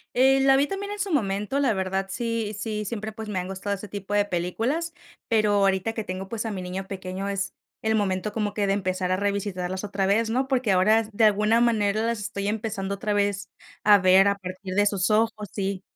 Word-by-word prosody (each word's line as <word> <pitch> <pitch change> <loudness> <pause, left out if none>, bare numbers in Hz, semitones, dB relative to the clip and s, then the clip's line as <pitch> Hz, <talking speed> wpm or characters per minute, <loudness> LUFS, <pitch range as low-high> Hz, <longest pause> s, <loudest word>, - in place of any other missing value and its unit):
Eh, 265 +2 +5
la 270 0 +5
vi 280 +1 +3
también 400 +3 -4
en 415 - -7
su 390 -1 -2
momento, 210 -1 0
la 270 -5 +2
verdad, 190 0 -1
sí 230 0 -2
sí, 215 -1 -3
siempre, 220 0 -4
pues, 220 0 -8
me 195 -3 -1
han 180 - -4
gustado 195 +1 -3
ese 200 +2 -9
tipo 200 0 -6
de 205 0 +3
películas, 225 - -2 0.3
pero 215 -2 +2
ahorita, 195 +1 +2
que 225 - -3
tengo, 185 0 -5
pues, 230 +1 -3
a 225 - -2
mi 190 -2 -4
niño 185 +1 -5
pequeño, 190 0 -5
es 195 -1 -2 0.3
el 220 0 +2
momento 205 -1 0
como 210 -2 -1
que 205 - +1
de 195 - +2
empezar 185 -2 -1
a 185 - +2
revisitarlas 190 -2 -2
otra 195 -1 -1
vez, 220 +3 +2
¿no?, 255 +4 0
porque 255 -5 +1
ahora, 210 +5 +4
de 220 +2 +1
alguna 215 +2 +3
manera, 215 -3 +2
las 230 -1 -1
estoy 200 -1 -4
empezando, 205 -2 -2
otra 210 +1 -2
vez, 200 -1 0 0.3
a 205 -1 +7
ver, 185 +1 +6
a 200 - +2
partir 185 0 -7
de 205 +1 +4
sus 195 -1 +1
ojos 215 -2 +1
sí. 195 -1 -3
205 Hz, 220 wpm, -25 LUFS, 195-225 Hz, 0.3 s, a